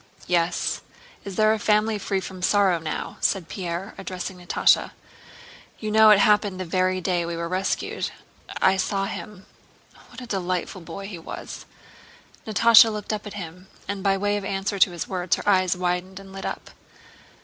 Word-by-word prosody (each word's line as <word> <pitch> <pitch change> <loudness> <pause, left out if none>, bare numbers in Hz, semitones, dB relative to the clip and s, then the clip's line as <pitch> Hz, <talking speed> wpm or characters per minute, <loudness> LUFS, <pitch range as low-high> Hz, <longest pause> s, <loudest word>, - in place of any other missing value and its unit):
"Yes, 175 -1 0 0.4
is 200 -2 -7
there 215 +1 +4
a 220 - -2
family 210 0 +2
free 195 -1 -1
from 185 0 -8
sorrow 190 -2 +3
now?" 155 -1 -5
said 185 -4 0
Pierre, 180 +1 -5
addressing 185 -1 -6
Natásha. 180 - +2 0.8
"You 215 -1 -4
know 220 0 +7
it 210 - +8
happened 205 -2 +3
the 185 - -3
very 185 +2 +1
day 180 -1 0
we 170 0 -4
were 170 0 -3
rescued. 185 +3 -2 0.5
I 190 0 +4
saw 195 +1 0
him. 200 -2 -7 0.6
What - - -12
a 250 - -8
delightful 185 -3 -3
boy 170 +4 -8
he 190 -4 -7
was!" 165 - -8 0.8
Natásha 225 +1 +7
looked 210 0 -4
at 210 -1 -5
him, 180 -1 -8 0.2
and 200 -1 -3
by 195 0 +2
way 205 +1 0
of 205 - -5
answer 195 +1 -2
to 190 - +6
his 175 - -5
words 180 -2 0
her - - -8
eyes 185 -2 +3
widened 180 +1 -2
and 195 -1 -13
lit 195 - -5
up. - - -6
190 Hz, 170 wpm, -24 LUFS, 180-205 Hz, 0.8 s, it